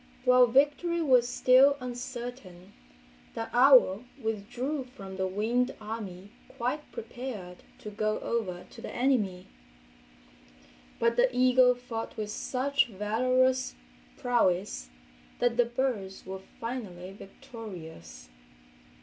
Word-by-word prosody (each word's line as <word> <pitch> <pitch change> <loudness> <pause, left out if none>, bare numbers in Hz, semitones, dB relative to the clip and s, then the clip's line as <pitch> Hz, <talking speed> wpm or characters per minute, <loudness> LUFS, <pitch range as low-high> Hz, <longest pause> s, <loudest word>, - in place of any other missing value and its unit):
While 250 0 +6
victory 290 +7 +2
was 255 -6 +4
still 260 +3 +5
uncertain 245 -6 -7 0.6
the 225 - -4
owl 250 -5 +6
withdrew 245 +5 -3
from 195 -6 -10
the 190 0 0
winged 230 +6 0
army 205 -3 -7 0.3
quite 255 +6 -3
prepared 220 -6 -7 0.2
to 210 - -8
go 215 +1 -1
over 185 -7 -3
to - - -12
the - - -6
enemy. 215 -8 0 1.5
But 235 0 +1
the 250 +1 +5
eagle 255 0 +5
fought 245 -2 -6
with 210 -1 -3
such 275 +5 0
valorous 255 +5 +1 0.4
prowess 190 - 0 0.5
that 245 -1 +1
the 245 0 +4
birds 235 -6 -3
were 190 0 -6 0.2
finally 205 -7 -6
victorious. 170 - -11
235 Hz, 105 wpm, -29 LUFS, 195-255 Hz, 1.5 s, While